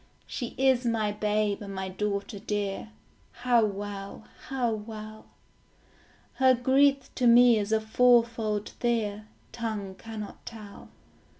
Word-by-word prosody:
She 240 - -5
is 260 -1 +3
my 225 -3 0
babe 210 0 0
and 200 -1 -7
my 190 0 -3
daughter 200 +2 -3
dear, 205 +1 -3 0.6
How 240 -2 +5
well, 200 0 -5 0.2
how 255 -3 0
well. 215 0 -7 1.1
Her 260 -1 +5
grief 270 +2 +2
to 250 - +1
me 235 -1 +7
is 205 +1 -3
a 220 - +3
fourfold 230 -2 +2
fear, 215 -3 -2 0.2
Tongue 215 -5 -4
cannot 215 0 -9
tell. 215 -3 -11
220 Hz, 120 wpm, -28 LUFS, 205-240 Hz, 1.1 s, me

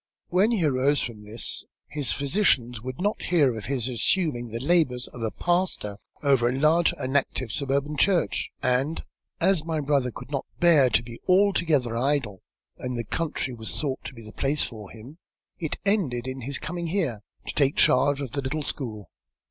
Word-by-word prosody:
When 190 +5 +3
he 210 -9 +1
arose 140 +1 +2
from 115 -3 -6
this, 110 +3 -1 0.2
his 145 -5 -1
physicians 135 - +1
would 130 +4 -6
not 205 +3 0
hear 145 -9 +3
of 110 -3 -6
his 130 0 -1
assuming 125 0 0
the 115 +1 -5
labours 135 -4 +2
of 120 - -10
a 110 - 0
pastor 175 - -1 0.3
over 135 -4 +4
a 130 - -1
large 160 +3 +4
and 130 0 -3
active 130 -4 0
suburban 140 +2 -1
church, 185 +3 +2
and, 130 +5 +1 0.4
as 190 -5 +3
my 160 -1 -2
brother 140 -3 +1
could 125 - -10
not 140 - -2
bear 160 -7 +6
to 115 - +2
be 120 0 -10
altogether 170 - +3
idle, 120 -6 0 0.4
and 125 -1 -3
the 120 - -1
country 150 -1 -2
was 110 -2 -6
thought 140 -4 -2
to 130 - -7
be 115 - -10
the 110 - -11
place 145 +2 0
for 105 -5 -7
him, 125 +9 -12 0.4
it 160 -3 -3
ended 155 - +1
in 130 0 -5
his 135 +3 -3
coming 175 0 -4
here, 160 - -1 0.3
to - - -4
take 140 -1 +2
charge 145 +2 +4
of 135 -4 -4
the 140 - -2
little 145 +3 -2
school. 110 -8 -5
140 Hz, 185 wpm, -26 LUFS, 120-160 Hz, 0.4 s, bear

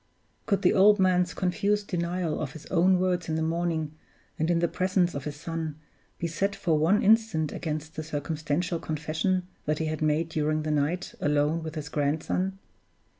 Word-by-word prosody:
Could 200 -3 +1
the 180 - +5
old 205 +2 +6
man's 180 -1 +2
confused 200 +3 0
denial 170 -2 -1
of 145 -2 -4
his 160 - -10
own 185 +1 +4
words 180 -2 0
in 155 - 0
the 160 - 0
morning, 165 -2 -1 0.5
and 160 +2 +1
in 175 - +3
the 170 +1 +2
presence 180 0 +1
of 140 -1 -5
his 150 -1 -4
son, 160 0 -4 0.4
be - - -3
set 195 +5 -1
for 180 -5 +1
one 165 +7 +3
instant 215 -8 +3
against 155 0 -4
the - - -3
circumstantial 155 +3 -2
confession 160 +5 -1 0.2
that 150 0 0
he 160 - -1
had 155 0 -3
made 155 +1 +2
during 155 -1 0
the 155 - -1
night 150 +5 0
alone 150 +2 +2
with 160 0 -6
his 150 -2 -4
grandson? 160 +6 -1
165 Hz, 180 wpm, -27 LUFS, 155-180 Hz, 0.5 s, old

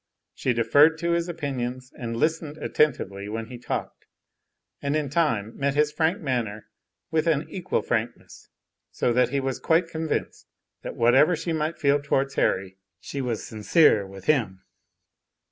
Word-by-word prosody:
She 125 - 0
deferred 145 +8 +5
to 170 +1 -1
his 170 +1 0
opinions, 130 -5 -4
and 115 -1 -5
listened 155 +2 -1
attentively 100 -12 0
when 115 +1 -5
he 125 - -8
talked, - - -5 0.7
and 140 +1 -1
in 150 -3 -1
time 115 -10 0
met 140 0 -1
his 150 0 +3
frank 160 +4 +1
manner 120 -7 -2 0.5
with 160 0 +1
an 155 -2 +1
equal 185 -1 -2
frankness, 120 0 -4 0.4
so 120 - 0
that 125 +1 +3
he 140 +1 0
was 135 -1 -2
quite 165 +1 +2
convinced 160 -1 -3 0.3
that - - -6
whatever 130 +9 +4
she 165 +1 -3
might 155 +1 -1
feel 145 -1 +2
towards 140 -1 0
Harry, 95 0 0 0.2
she 140 - -5
was 120 -4 -2
sincere 110 - +3
with 95 0 -12
him. 110 -11 +1
140 Hz, 155 wpm, -25 LUFS, 115-155 Hz, 0.7 s, deferred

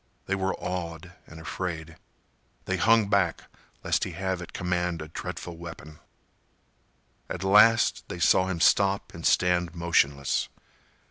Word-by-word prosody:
They 100 - -2
were 95 0 -1
awed 90 -1 -5
and 80 - -12
afraid. 80 -1 -5 0.7
They 95 - -1
hung 110 0 +4
back 100 0 +1 0.4
lest - - +1
he - - -4
have 95 -1 -3
at 90 - -9
command 90 -1 -2
a 75 0 -8
dreadful 85 +1 -7
weapon. 80 -2 -10 1.3
At - - -5
last, 105 +4 +5
they - - -6
saw 90 +2 +3
him 90 -3 -3
stop 100 +2 +3
and 85 - -9
stand 90 -1 +2
motionless. 70 -5 +1
90 Hz, 135 wpm, -27 LUFS, 85-95 Hz, 1.3 s, last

